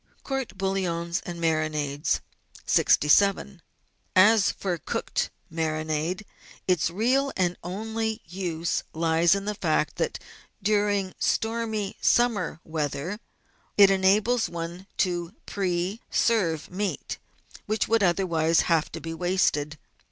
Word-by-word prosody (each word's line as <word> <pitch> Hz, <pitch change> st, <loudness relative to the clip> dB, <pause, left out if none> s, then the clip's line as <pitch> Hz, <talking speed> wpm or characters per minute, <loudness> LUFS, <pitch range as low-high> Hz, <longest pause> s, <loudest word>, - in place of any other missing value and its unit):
COURT 270 Hz, -2 st, -3 dB
BOUILLONS 180 Hz, -3 st, -1 dB
AND 175 Hz, -1 st, -5 dB
MARINADES 155 Hz, -3 st, 0 dB, 0.4 s
67 195 Hz, +4 st, +3 dB, 0.5 s
As 205 Hz, +2 st, +6 dB
for 180 Hz, -4 st, -3 dB
cooked -, -, -2 dB, 0.2 s
marinade, 160 Hz, +3 st, -1 dB, 0.4 s
its 180 Hz, -3 st, +2 dB
real 255 Hz, +9 st, +1 dB
and 180 Hz, -2 st, +1 dB
only 220 Hz, +4 st, -3 dB
use 170 Hz, -1 st, -2 dB
lies 165 Hz, +2 st, +3 dB
in 200 Hz, 0 st, -3 dB
the 210 Hz, -, -1 dB
fact 160 Hz, -6 st, 0 dB
that -, -, -1 dB, 0.4 s
during 205 Hz, -2 st, +1 dB
stormy 220 Hz, -3 st, -1 dB
summer 225 Hz, -9 st, +2 dB
weather 160 Hz, +4 st, -3 dB, 0.6 s
it 200 Hz, -1 st, +8 dB
enables 205 Hz, +5 st, +3 dB
one 170 Hz, +2 st, -6 dB
to 175 Hz, +1 st, -1 dB
pre. 185 Hz, +2 st, -2 dB
serve 180 Hz, -10 st, +1 dB
meat 195 Hz, +2 st, -3 dB, 0.5 s
which 215 Hz, +1 st, 0 dB
would 225 Hz, 0 st, +3 dB
otherwise 170 Hz, -3 st, +2 dB
have 165 Hz, -3 st, +1 dB
to 165 Hz, -, -4 dB
be 165 Hz, 0 st, -6 dB
wasted. 165 Hz, -4 st, 0 dB
185 Hz, 110 wpm, -26 LUFS, 165-205 Hz, 0.6 s, it